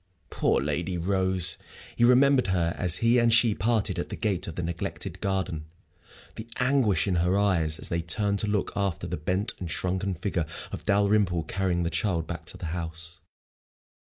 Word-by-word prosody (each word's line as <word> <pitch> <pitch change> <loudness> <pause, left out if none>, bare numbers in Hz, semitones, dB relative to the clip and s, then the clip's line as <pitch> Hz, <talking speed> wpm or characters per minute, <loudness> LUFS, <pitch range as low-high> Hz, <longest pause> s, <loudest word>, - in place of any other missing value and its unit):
Poor - - +2
Lady 85 +6 -2
Rose! 95 -1 +1 0.4
He - - +1
remembered 130 +1 +5
her 85 -3 +1
as 90 -2 +3
he 120 +2 +5
and 120 -1 +3
she 115 -1 +4
parted 110 +1 0
at - - -4
the - - -4
gate 100 -5 -1
of 85 - -6
the 90 - -3
neglected 90 +2 -5
garden, 95 -5 -2 0.7
the 110 - -7
anguish 125 - +2
in 90 -3 +1
her 90 +3 +2
eyes 85 -7 +1
as - - -3
they 85 0 -1
turned 100 +4 0
to 105 - 0
look 105 -2 0
after 100 -4 -1
the - - -3
bent 95 +8 -1
and 90 - -5
shrunken 95 +3 -1
figure 85 -2 -2 0.2
of - - -7
Dalrymple 100 -4 +2
carrying 90 +1 -1
the 85 - -1
child 85 -6 0
back 80 0 -6
to - - -6
the - - -7
house. 85 0 -6
95 Hz, 180 wpm, -27 LUFS, 85-105 Hz, 0.7 s, remembered